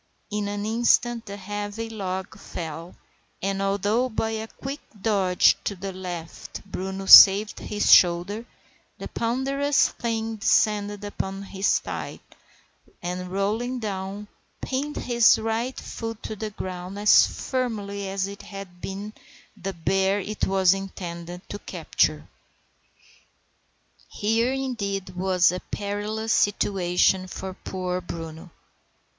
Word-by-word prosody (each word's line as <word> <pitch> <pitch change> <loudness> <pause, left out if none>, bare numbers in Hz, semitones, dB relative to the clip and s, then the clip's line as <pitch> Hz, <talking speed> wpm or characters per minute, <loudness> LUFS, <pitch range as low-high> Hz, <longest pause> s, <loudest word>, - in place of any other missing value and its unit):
In 210 0 -1
an 205 0 -3
instant 235 +1 +2
the 200 0 -6
heavy 205 +3 -5
log 190 -4 -4
fell, 165 +1 -7 0.4
and, 195 0 -2
although 205 +5 +1
by 225 -1 -1
a 220 0 -4
quick 275 +5 -7 0.2
dodge 195 -4 +3
to 200 - -1
the 195 +1 -6
left 180 -1 -7
Bruno 190 0 -5
saved 200 +2 +9
his 210 -1 +3
shoulder, 180 +5 +4 0.5
the - - -6
ponderous 275 +4 +1
thing 225 -1 -3
descended 205 -1 +2
upon 195 -1 -4
his 195 0 +1
thigh, - - -6 0.8
and, 180 +1 -4
rolling 220 +6 -1
down, 200 -2 -4 0.3
pinned 280 +3 -3
his 235 -2 +4
right 225 +3 -2
foot 225 -1 -6
to 220 - -5
the 215 +1 -4
ground 185 -1 -6
as 205 +1 +6
firmly 205 -6 -3
as 195 0 -1
if 200 0 -8
he - - -14
had 195 -3 -9
been 200 +2 -6 0.4
the 195 -1 -5
bear 190 +4 +1
it 210 +2 -2
was 190 -1 +4
intended 180 -2 -7
to 205 - -6
capture. - - -1 1.8
Here, 225 +4 +1
indeed, 205 -8 -3
was 185 -1 +3
a 180 - -3
perilous 210 +3 -3
situation 185 -2 +2
for 190 +1 -6
poor 185 -1 -4
Bruno. 165 0 -8
200 Hz, 125 wpm, -25 LUFS, 190-220 Hz, 1.8 s, saved